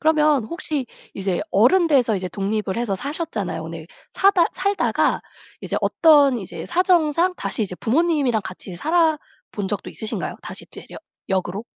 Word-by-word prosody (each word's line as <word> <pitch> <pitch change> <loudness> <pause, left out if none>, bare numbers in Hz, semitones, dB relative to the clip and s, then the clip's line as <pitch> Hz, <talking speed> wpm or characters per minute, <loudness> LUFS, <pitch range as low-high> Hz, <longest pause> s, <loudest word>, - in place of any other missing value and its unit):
그러면 305 -5 +3
혹시 300 -1 -3 0.3
이제 190 -2 -2
어른 265 - +4
돼서 250 -8 +3
이제 185 -1 -4
독립을 200 +1 -2
해서 235 -4 -1
사셨잖아요. 250 - -4
근데 160 0 -8 0.3
사다 385 -3 +4
살다가 395 +2 +1 0.4
이제 - - -3
어떤 290 -6 +4
이제 195 - -7
사정상 350 -1 +2
다시 225 - -2
이제 190 -3 -4
부모님이랑 270 - +1
같이 185 0 -8
살아 320 - +2 0.3
본 200 -2 -4
적도 205 - -4
있으신가요? 220 - -4
다시 - - -8
되려 - - -12 0.3
역으로? 190 +2 -2
255 Hz, 340 characters per minute, -22 LUFS, 195-325 Hz, 0.4 s, 어른